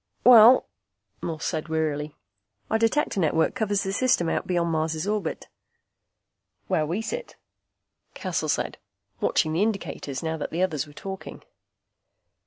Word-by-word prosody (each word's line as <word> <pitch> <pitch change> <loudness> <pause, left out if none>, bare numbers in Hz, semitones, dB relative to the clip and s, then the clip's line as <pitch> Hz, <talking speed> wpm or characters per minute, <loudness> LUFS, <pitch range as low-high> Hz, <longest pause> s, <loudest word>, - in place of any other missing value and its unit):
"Well," 245 +1 +8 0.5
Morse 165 -2 -4
said 155 -1 -2
wearily, 155 -2 -2 0.6
"Our 220 - +2
Detector 230 -1 +1
network 160 -1 +2
covers 205 -5 0
the 195 -1 -2
system 240 -8 +2
out - - -2
beyond 170 -2 0
Mars' 160 0 -1
orbit." 205 -5 -2 1.2
"Where 155 - 0
we 185 +8 -2
sit," 485 - -5 0.8
Cassel - - -2
said, - - -1 0.4
watching 155 -1 +1
the 165 - +1
indicators 195 - -2
now 160 0 -2
that 150 - -4
the 170 +3 -1
others 155 -5 -1
were 145 - -15
talking. 190 +4 -8
170 Hz, 135 wpm, -25 LUFS, 155-215 Hz, 1.2 s, Well